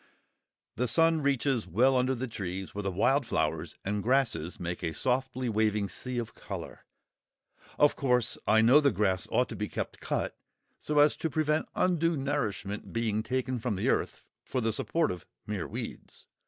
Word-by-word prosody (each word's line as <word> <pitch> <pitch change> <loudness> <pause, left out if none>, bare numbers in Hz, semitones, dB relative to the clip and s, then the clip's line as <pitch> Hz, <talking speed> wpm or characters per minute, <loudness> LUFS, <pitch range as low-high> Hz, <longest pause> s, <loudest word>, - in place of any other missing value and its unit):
The 125 - +1
sun 165 +6 +4
reaches 135 -5 +1
well 125 +10 +3
under 130 +1 +2
the 130 +2 -3
trees, 95 -4 -5
where 105 - -3
the 100 - -1
wild 135 +10 +2
flowers - - -1
and 100 +1 -1
grasses 115 - +1
make 90 0 -4
a 80 -2 -2
softly 130 +2 0
waving 105 -2 +1
sea 125 +5 -3
of 115 -2 -3
colour. - - -8 0.9
Of 145 - +5
course, 125 -4 +1
I 110 +1 +5
know 125 +6 +7
the 145 -2 +4
grass 95 -3 0
ought - - +2
to - - -6
be - - -3
kept - - -5
cut, - - -2 0.4
so 150 - -2
as 145 0 +6
to 160 - -2
prevent 155 +1 0
undue 170 -3 +2
nourishment 110 -8 -2
being 110 -2 0
taken 130 +2 -2
from 115 -2 -1
the 95 - 0
earth - - -1 0.2
for 130 - -2
the 115 -2 0
support 165 +7 0
of 90 -3 -8 0.2
"mere - - -3
weeds." - - -7
125 Hz, 175 wpm, -29 LUFS, 105-140 Hz, 0.9 s, know